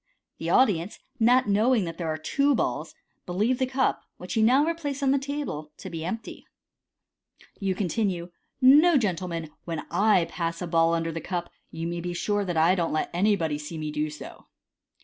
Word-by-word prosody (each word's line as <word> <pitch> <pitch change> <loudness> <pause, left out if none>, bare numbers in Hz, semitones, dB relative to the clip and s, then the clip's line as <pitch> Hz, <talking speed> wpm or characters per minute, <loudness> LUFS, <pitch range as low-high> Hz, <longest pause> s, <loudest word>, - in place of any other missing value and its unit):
The - - -3
audience, 200 -7 +2 0.2
not 245 +1 +4
knowing 215 +3 +3
that 165 0 -7
there 170 - -2
are 155 - -2
two 280 - +1
balls, - - -2 0.3
believe 215 +8 0
the 260 - +1
cup, 260 0 0 0.2
which 180 - -6
you 220 - +3
now 255 +6 +5
replace 295 -4 -3
on 270 - +3
the 275 - +3
table, 275 - -4
to - - -8
be 165 -2 -5
empty. 225 +7 -5 1.2
You 195 -2 -1
continue, 180 -2 -1 0.2
" - - -49 0.2
No, 345 -4 +5
gentlemen; 175 - -2
when 165 -2 -3
I 195 -1 +3
pass 170 -1 -4
a 180 - -3
ball 165 0 +3
under 165 0 -1
a 165 0 -5
cup, 175 -2 -4 0.2
you 165 0 -5
may 170 +1 -3
be 175 0 -4
sure 205 +3 0
that 175 -4 -3
I 165 +3 +5
don't 170 -3 0
let 155 - -1
anybody 175 -5 +1
see 150 +2 -7
me 155 -1 -4
do 150 +1 -1
so." 150 - -11
180 Hz, 190 wpm, -26 LUFS, 165-235 Hz, 1.2 s, now